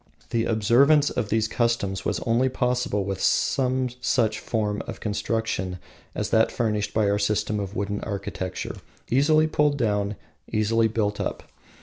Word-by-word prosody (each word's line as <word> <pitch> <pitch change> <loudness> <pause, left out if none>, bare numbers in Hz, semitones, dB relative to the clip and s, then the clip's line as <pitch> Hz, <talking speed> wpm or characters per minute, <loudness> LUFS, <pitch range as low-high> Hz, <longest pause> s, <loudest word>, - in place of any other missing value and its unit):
The 115 -1 +1
observance 130 +8 +4
of 115 -4 -2
these 110 0 +1
customs 110 -5 0
was - - 0
only 125 +2 +2
possible 125 -5 0
with 95 -1 -3
some 130 -1 +2
form 110 -3 -1
of - - -6
construction 105 -3 -2 0.4
as - - -2
that 110 0 +4
furnished 105 -4 -1
by 110 -2 +1
our 100 0 +1
system 105 0 0
of 100 0 -5
wooden 100 0 -2
architecture, 100 -3 -4 0.3
easily 155 +5 +4
pulled 150 -2 +1
down, 105 -4 0 0.4
easily 110 +1 +2
built 105 -2 -1
up. - - -3
110 Hz, 140 wpm, -25 LUFS, 105-125 Hz, 0.4 s, observance